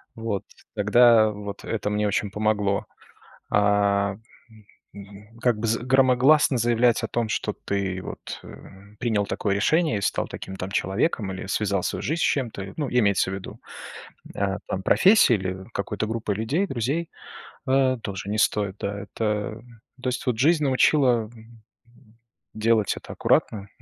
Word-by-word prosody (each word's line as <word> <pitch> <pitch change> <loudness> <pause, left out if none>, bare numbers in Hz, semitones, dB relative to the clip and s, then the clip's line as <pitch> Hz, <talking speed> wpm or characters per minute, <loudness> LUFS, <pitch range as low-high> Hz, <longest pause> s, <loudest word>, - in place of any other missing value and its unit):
вот, 115 -3 -3 0.3
тогда 110 +1 +5
вот 100 -1 -8
это 110 -2 -2
мне 105 0 0
очень 105 0 -1
помогло. 105 -1 0 0.7
А 100 -1 +2 1.2
как 120 -3 +1
бы 115 - -2 0.2
громогласно 130 +2 +4
заявлять 120 0 +2
о - - -2
том, 115 -2 -1
что - - -2
ты 95 -2 -3
вот - - -8 0.6
принял 110 -4 0
такое 100 -1 -1
решение 155 +1 +2
и - - -4
стал 100 - -1
таким 95 - -8
там 95 +1 -5
человеком 100 - -1
или 95 +1 -7
связал 100 -2 -1
свою - - -3
жизнь 160 +4 -1
с - - +3
чем-то, 110 -8 -2
ну, 145 -3 -2
имеется 100 -6 +2
в - - -4
виду, 95 - -9 0.8
а 100 0 -1
там, 95 0 -3
профессии 195 - +5
или 95 -2 -3
какой-то 105 +1 -3
группы 110 -3 -2
людей, 145 - -1
друзей, 135 +7 -2 0.6
а 130 -1 +3
тоже 100 -2 -6
не 105 - -1
стоит, 100 -2 +1
да. 100 0 -3
Это, 105 +1 -3 0.3
ну 130 - -21
то 130 - -2
есть 125 0 -3
вот 125 -3 0
жизнь 155 +4 +3
научила. 130 -4 +3 1.2
Делать 110 -2 +1
это - - -9
аккуратно, 100 -2 0
110 Hz, 145 wpm, -24 LUFS, 100-125 Hz, 1.2 s, тогда